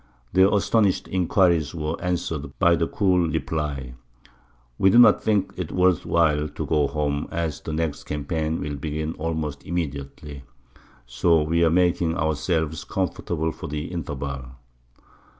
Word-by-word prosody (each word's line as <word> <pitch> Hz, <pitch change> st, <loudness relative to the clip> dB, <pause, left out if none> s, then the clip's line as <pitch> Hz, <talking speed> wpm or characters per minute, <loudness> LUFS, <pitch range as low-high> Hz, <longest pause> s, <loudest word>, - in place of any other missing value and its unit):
Their 95 Hz, +2 st, +5 dB
astonished 105 Hz, -1 st, +2 dB
inquiries 85 Hz, -4 st, +2 dB
were 80 Hz, 0 st, -2 dB
answered 80 Hz, -5 st, -3 dB
by 85 Hz, -2 st, +4 dB
the 85 Hz, -1 st, 0 dB
cool 90 Hz, -4 st, +2 dB
reply, 70 Hz, -5 st, -3 dB, 0.9 s
"We 95 Hz, -, +5 dB
do 95 Hz, -, +4 dB
not 120 Hz, -, +7 dB
think 105 Hz, -3 st, +1 dB
it 90 Hz, -4 st, -4 dB
is -, -, -6 dB
worth 90 Hz, -2 st, +3 dB
while 75 Hz, -3 st, +2 dB
to -, -, -5 dB
go 75 Hz, -3 st, +2 dB
home, 75 Hz, -1 st, -2 dB
as 80 Hz, -3 st, -3 dB
the -, -, -6 dB
next 80 Hz, -2 st, -2 dB
campaign 80 Hz, +2 st, -2 dB
will 75 Hz, -1 st, -4 dB
begin 75 Hz, +2 st, -3 dB
almost 80 Hz, -3 st, -3 dB
immediately; 70 Hz, -3 st, -5 dB, 0.6 s
so 75 Hz, +7 st, +2 dB
we 85 Hz, +2 st, +1 dB
are 80 Hz, -, +5 dB
making 85 Hz, -1 st, +2 dB
ourselves 80 Hz, 0 st, -1 dB
comfortable 80 Hz, -1 st, -2 dB
for -, -, -8 dB
the 75 Hz, +2 st, -5 dB
interval!" 70 Hz, -6 st, -4 dB
80 Hz, 145 wpm, -24 LUFS, 75-85 Hz, 0.9 s, not